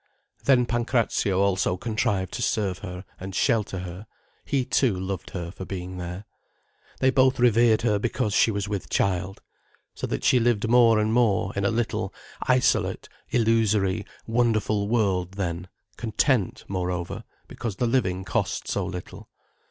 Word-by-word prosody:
Then 130 -3 +5
Pancrazio 115 -5 0
also 95 -2 +1
contrived 100 -3 -1
to 125 - -4
serve 100 -6 0
her 90 -1 -7
and 95 0 -7
shelter 110 -7 +1
her, 90 +4 -8 0.4
he 135 -3 0
too, 115 -9 +1
loved 95 -1 -4
her 85 -2 -5
for 95 - -8
being 90 -1 -6
there. 90 +3 -6 0.8
They 130 0 +4
both 130 0 +4
revered 115 -2 +4
her 105 -3 +2
because 105 -2 -1
she - - +4
was 100 -1 -2
with 100 -2 -4
child. 95 0 -1 0.5
So - - -4
that - - -3
she 125 - +5
lived 115 -2 +1
more 115 -1 +5
and 110 +1 +1
more 105 -5 +2
in 100 0 -1
a - - +3
little, 115 0 -1 0.4
isolate, 125 -1 +2 0.2
illusory, 110 -5 +2 0.2
wonderful 110 -3 +1
world 95 -6 +1
then, 90 -2 -3 0.3
content, 115 - 0
moreover, 90 -2 -3 0.2
because 115 -5 -5
the 120 - 0
living 95 -7 0
cost - - -1
so - - -1
little. 90 -1 -7
105 Hz, 150 wpm, -25 LUFS, 95-115 Hz, 0.8 s, Then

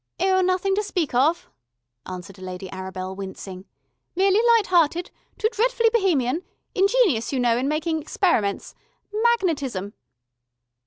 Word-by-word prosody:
"Oh, 375 +1 +3
nothing 370 +1 +1
to 405 - +1
speak 360 -9 -2
of," 315 +8 +2 0.6
answered 185 +1 -8
Lady 185 0 -7
Arabel, 185 0 -6
wincing. 190 -1 -8 0.5
"Merely 390 +3 +3 0.2
lighthearted... 350 -4 +1 0.3
too 435 - +2
dretfully 465 0 +2
Bohemian... 330 - +1 0.3
ingenious, 390 - +2
you 270 - -1
know, 240 -2 +3
in 255 +3 -1
making 315 +2 -1
experiments... 285 - 0 0.4
magnetism...." 325 - 0
320 Hz, 115 wpm, -23 LUFS, -, 0.6 s, Oh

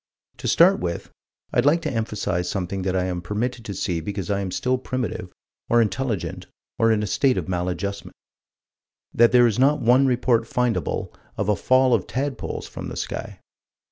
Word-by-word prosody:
To - - -5
start - - +5
with, 85 -1 -4 0.4
I'd 120 - +3
like 165 +3 +3
to 155 - -2
emphasize 105 -6 -2
something 95 0 -3
that 95 0 -1
I 90 - +1
am 90 -1 -3
permitted 115 +6 -3
to 100 - -5
see 90 -3 -2
because 100 +1 -4
I 100 - +1
am 95 -1 -3
still 125 +7 0
primitive 130 -2 -4 0.4
or 120 - +4
intelligent 115 -1 -1 0.3
or 115 0 +4
in 105 -1 +1
a - - 0
state 130 +6 +2
of - - -2
maladjustment: 90 +2 -3 1.0
That 120 0 +5
there 120 0 +6
is 115 -1 +1
not 140 +3 +4
one 125 +4 +4
report 120 -2 +2
findable 125 0 -1 0.2
of - - -1
a 105 - +4
fall 130 +6 +3
of 110 -6 +1
tadpoles 135 -1 -3
from - - -7
the - - -7
sky. - - -5
110 Hz, 180 wpm, -23 LUFS, 95-125 Hz, 1.0 s, there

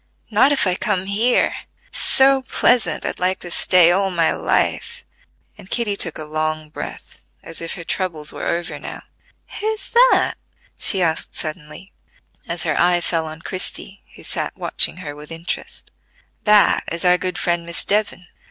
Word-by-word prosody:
"Not 225 +7 +5
if 280 - +3
I 185 - +2
come 190 0 -1
here; 220 +5 +2 0.3
it's - - -6
so 270 0 +4
pleasant 250 -1 +1
I'd - - -3
like 185 +1 +1
to 175 - -7
stay 175 -1 +5
all 195 +2 +2
my 170 -3 +2
life," 470 +1 -1 0.5
and 190 -2 -13
Kitty 225 -4 0
took - - 0
a 155 - -6
long 155 0 -2
breath, - - -8 0.2
as 165 - -8
if 165 - -4
her 170 - -7
troubles 165 -4 -3
were - - -4
over 170 0 -2
now. - - -8 0.6
"Who's 430 -1 -3
that?" - - +4 0.4
she 190 -3 +2
asked 160 -1 -1
suddenly, 155 +3 -7 0.5
as - - +1
her - - 0
eye 175 0 +4
fell 165 -2 0
on 155 +1 -9
Christie, 190 +1 -4
who - - -14
sat - - -3
watching - - 0
her 145 0 -5
with 150 +2 -11
interest: 165 +2 -5 0.5
"That 210 -1 +5
is 170 +2 -3
our 180 0 +5
good 185 -1 -3
friend 175 -1 0
Miss 170 0 -3
Devon. 205 -3 0
180 Hz, 170 wpm, -20 LUFS, 165-210 Hz, 0.6 s, Not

